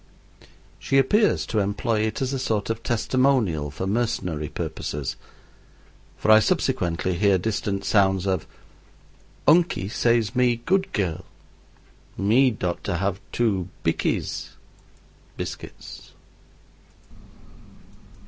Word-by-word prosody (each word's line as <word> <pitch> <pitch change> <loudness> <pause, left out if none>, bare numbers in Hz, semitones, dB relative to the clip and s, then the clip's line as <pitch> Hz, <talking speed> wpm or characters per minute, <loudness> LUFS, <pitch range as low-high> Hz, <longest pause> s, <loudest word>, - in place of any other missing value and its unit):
She 135 - +1
appears 205 - +3
to 110 - -1
employ 105 +3 0
it 110 - -3
as 130 +1 -2
a 135 - -1
sort 110 -4 -1
of 115 0 -4
testimonial 120 - +1
for 75 +6 -5
mercenary 95 - -1
purposes, 70 -2 -4 1.0
for 110 - +2
I 110 - +9
subsequently 90 -4 0
hear 100 -2 +4
distant 100 0 -2
sounds 95 -2 +3
of 95 -3 -1 1.0
"Unkie 150 - +3
says 115 0 +1
me 125 -1 +3
dood 190 +12 0
dirl 90 -6 -2 0.9
me 120 +7 +4
dot 90 -6 -3
to 95 -4 -1
have 100 +2 -2
two 100 -6 0
bikkies - - -2 0.8
[biscuits]." - - -8
105 Hz, 105 wpm, -24 LUFS, 95-120 Hz, 1.0 s, I